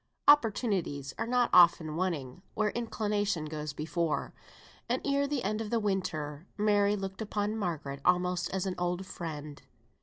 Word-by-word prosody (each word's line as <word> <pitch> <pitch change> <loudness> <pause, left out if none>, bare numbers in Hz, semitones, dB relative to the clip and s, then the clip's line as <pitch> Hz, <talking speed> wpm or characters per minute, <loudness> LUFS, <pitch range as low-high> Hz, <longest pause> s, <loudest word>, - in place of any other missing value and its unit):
Opportunities 205 - +3
are 225 - -1
not 245 0 +2
often 170 -3 +6
wanting 165 -5 -2
where 210 -1 +1
inclination 210 -7 -1
goes 150 -1 -4
before, 160 +2 -2 0.6
and - - +1
ere 280 0 +2
the 280 -3 -2
end 215 +2 -1
of 215 - -4
that 235 - +1
winter 175 -6 -2
Mary 205 -1 +3
looked 195 0 -5
upon 210 0 -1
Margaret 155 -9 -3
almost 180 0 +2
as 190 0 -2
an 190 - -1
old 175 +1 -1
friend. 150 -5 -7
185 Hz, 150 wpm, -30 LUFS, 160-210 Hz, 0.6 s, often